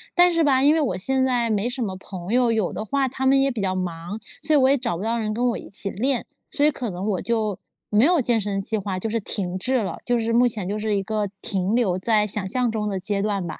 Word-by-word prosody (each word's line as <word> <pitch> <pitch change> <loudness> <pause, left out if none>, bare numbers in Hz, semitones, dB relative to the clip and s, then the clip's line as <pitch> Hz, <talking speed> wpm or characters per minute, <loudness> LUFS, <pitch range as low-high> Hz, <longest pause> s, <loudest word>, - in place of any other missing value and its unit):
但 355 0 +6
是 335 -1 +2
吧， 270 -3 +3
因 290 +2 +6
为 320 - +2
我 215 -11 -1
现 265 +7 +2
在 245 -3 +1
没 215 +3 0
什 250 0 -2
么 190 -4 -3
朋 185 +1 -7
友， 245 -1 +3
有 220 -5 0
的 - - -4
话 275 +4 0
他 265 +1 -2
们 270 +1 +5
也 275 0 +2
比 235 -4 -4
较 190 -1 0
忙， 180 +2 -4 0.2
所 300 +2 -2
以 - - +6
我 260 -2 +4
也 275 - +5
找 235 -10 -2
不 185 - -5
到 230 +1 -1
人 215 -1 -2
跟 245 +3 0
我 235 - -2
一 - - -11
起 200 0 0
练。 255 +5 -1 0.3
所 290 - +2
以 305 - +5
可 250 -4 -4
能 185 +2 -5
我 185 - -2
就 220 -4 -1 0.3
没 210 +2 +4
有 345 +1 +4
健 235 -3 +1
身 200 -1 -2
计 195 +3 -2
划， 195 -3 -3
就 185 - -3
是 225 +1 -1
停 190 -3 -3
滞 255 +6 +1
了， 190 - -5
就 245 -1 +1
是 230 0 -1
目 245 +1 +5
前 215 -6 -2
就 205 +2 -3
是 215 -1 0
一 195 - -1
个 210 0 -2
停 195 +2 -1
留 220 -7 +2
在 210 +2 +2
想 205 -1 0
象 245 +3 +1
中 210 -1 -2
的 195 -2 -2
阶 200 +1 -1
段 200 -3 -1
吧。 165 - -7
220 Hz, 310 characters per minute, -23 LUFS, 195-250 Hz, 0.3 s, 但